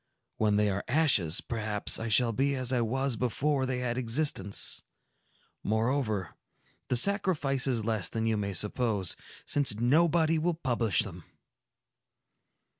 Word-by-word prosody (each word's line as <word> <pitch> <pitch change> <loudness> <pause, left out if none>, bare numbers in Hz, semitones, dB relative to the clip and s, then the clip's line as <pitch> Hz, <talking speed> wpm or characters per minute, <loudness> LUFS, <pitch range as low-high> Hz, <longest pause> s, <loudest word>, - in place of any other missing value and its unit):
When 105 -1 +1
they 105 0 +2
are 100 +1 -3
ashes, 125 - +3
perhaps 110 -3 -1
I 115 - -4
shall 115 +1 +2
be 140 +4 0
as 130 -1 -1
I 125 - +1
was 130 +3 -1
before 130 +3 -1
they 130 -1 -2
had 125 0 -2
existence. 115 -5 0 0.8
Moreover, 110 - -1 0.5
the 125 - +1
sacrifice 150 - +2
is 120 -5 -1
less 110 -4 -1
than 115 0 -3
you 110 -1 +1
may 100 -1 -3
suppose, 105 -1 0 0.3
since 140 -7 +3
nobody 160 +5 +3
will 170 +1 0
publish 120 - 0
them." - - -10
120 Hz, 135 wpm, -29 LUFS, 110-140 Hz, 0.8 s, ashes